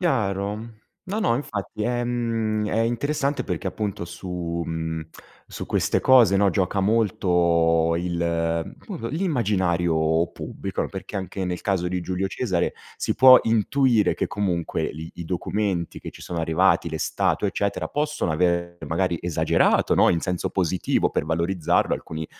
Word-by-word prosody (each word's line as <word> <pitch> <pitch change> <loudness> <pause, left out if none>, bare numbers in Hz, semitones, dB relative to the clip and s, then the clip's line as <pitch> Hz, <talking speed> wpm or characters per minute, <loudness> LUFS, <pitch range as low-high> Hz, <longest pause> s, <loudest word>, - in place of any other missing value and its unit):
Chiaro. 110 - -1 0.3
No, 210 +3 -2
no, 120 - +2
infatti, 105 -5 -5
ehm, 115 -3 -1
è 115 - 0
interessante 140 +5 0
perché 90 +1 -3
appunto 100 -2 -4
su, 85 -1 -4
mhmm, 80 -1 -4 0.4
su - - -7
queste - - 0
cose 120 -7 +6
no, 100 0 +4
gioca 95 +1 0
molto 85 -6 +2
il, 85 -1 -1
come - - -6
po 115 - -5
l'immaginario 90 - +1
pubblico, - - -4
perché - - -8
anche 95 0 -4
nel 90 -1 -3
caso 95 -3 0
di 90 0 -2
Giulio 95 +2 -2
Cesare 95 -4 -1 0.2
si - - -1
può 130 -1 +9
intuire 115 -1 +2
che - - -1
comunque 90 -5 -2
lì 80 +2 -7
i 85 - -7
documenti 90 0 -2
che - - -7
ci - - -15
sono 85 -2 -4
arrivati, 85 +1 +2
le 80 - -3
statue, - - 0
eccetera, 100 -5 -2
possono 150 - -1
avere 85 +1 0
magari 85 +1 0
esagerato, 85 -3 +2
no, - - +5
in 85 - +3
senso 90 -2 -2
positivo 95 -1 +1
per - - -1
valorizzarlo, 85 +1 +1
alcuni 80 -1 -6
95 Hz, 145 wpm, -24 LUFS, 85-110 Hz, 0.4 s, può